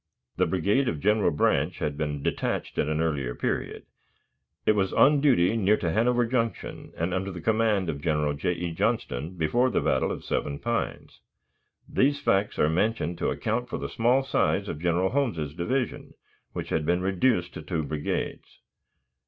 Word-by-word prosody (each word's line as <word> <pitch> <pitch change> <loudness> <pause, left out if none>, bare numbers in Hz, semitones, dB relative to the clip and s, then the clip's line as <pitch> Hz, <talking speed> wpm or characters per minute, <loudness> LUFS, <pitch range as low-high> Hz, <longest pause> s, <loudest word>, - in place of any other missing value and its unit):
The - - +3
brigade 100 +9 +1
of 75 - -3
General 105 +2 +3
Branch 75 -3 +1
had 75 - -2
been 75 -1 -3
detached - - -2
at - - +1
an 75 +1 0
earlier 70 -7 -1
period; - - -3 0.8
it - - +5
was 95 -3 +1
on 145 0 +5
duty 120 -9 +4
near 105 -1 +3
to 85 - -1
Hanover 120 +4 +2
Junction, 115 -1 -3
and 85 +2 -1
under 95 +1 -2
the 90 - -7
command 110 -1 +1
of 75 -3 -3
General 75 -2 +1
J. 75 +5 -1
E. 85 0 -4
Johnston 80 +1 -2
before 120 +11 +2
the - - +1
battle - - +1
of - - -5
Seven 70 - -2
Pines. 115 +6 -3 0.7
These 140 +2 +2
facts 100 -7 +1
are - - +3
mentioned 85 0 0
to - - 0
account 120 +3 -2
for - - -3
the - - -5
small 125 +4 +2
size 135 - +1
of 75 - -5
General 90 +2 +2
Holmes's 95 - -1
division, 120 +10 -2 0.4
which - - -5
had 80 - 0
been 90 +3 +1
reduced 95 -1 +1
to - - -7
two 80 0 -2
brigades. 75 0 -4
90 Hz, 175 wpm, -27 LUFS, 80-115 Hz, 0.8 s, it